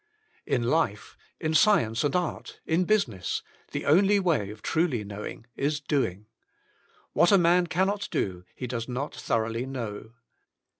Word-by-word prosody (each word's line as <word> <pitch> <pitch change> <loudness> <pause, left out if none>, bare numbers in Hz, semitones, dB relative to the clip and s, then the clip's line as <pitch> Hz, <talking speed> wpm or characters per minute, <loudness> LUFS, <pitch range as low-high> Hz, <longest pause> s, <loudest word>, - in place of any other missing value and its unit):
In 125 - +1
life, 120 -6 0 0.2
in 155 0 -1
science 155 - +4
and 145 +1 0
art, 180 -3 -3
in 170 +3 +2
business, 115 - 0 0.3
the - - -3
only 195 +7 +5
way 160 - +1
of 105 +1 -10
truly 155 -9 +1
knowing, 105 +2 -7
is 150 +2 0
doing. 130 - -1 0.9
What 175 - +4
a 200 - +7
man 175 0 +4
can 180 +3 +2
not 200 +1 -2
do 90 -2 -2
he 125 - -5
does 115 -2 -4
not 135 +4 -3
thoroughly 115 +2 -1
know. 115 -4 -6
140 Hz, 150 wpm, -27 LUFS, 110-175 Hz, 0.9 s, a